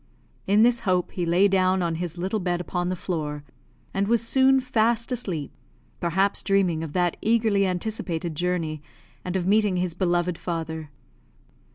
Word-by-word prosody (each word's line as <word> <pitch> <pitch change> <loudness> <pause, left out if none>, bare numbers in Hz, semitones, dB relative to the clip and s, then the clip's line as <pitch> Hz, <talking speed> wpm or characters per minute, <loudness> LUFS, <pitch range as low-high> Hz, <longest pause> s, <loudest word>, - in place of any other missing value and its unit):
In 205 +3 +5
this 240 0 +4
hope 185 -5 0
he 175 -2 -3
lay 180 +4 +4
down 185 -1 +2
on 170 -1 0
his 175 +1 -4
little 190 +5 -1
bed 175 -2 -1
upon 180 0 -2
the 185 - -1
floor, 150 -5 -4 0.5
and 195 +1 0
was 230 0 +1
soon 265 +1 +4
fast 235 -1 +1
asleep; 185 - -3 0.5
perhaps 190 +4 +1
dreaming 190 -5 +1
of 155 -3 -6
that 175 -2 +1
eagerly 220 -3 +2
anticipated 180 -3 -3
journey, 165 -2 -2 0.4
and 180 0 -4
of 180 -2 0
meeting 205 -1 +3
his 180 -1 -1
beloved 175 -1 0
father. 160 -3 -4
180 Hz, 160 wpm, -25 LUFS, 170-205 Hz, 0.5 s, In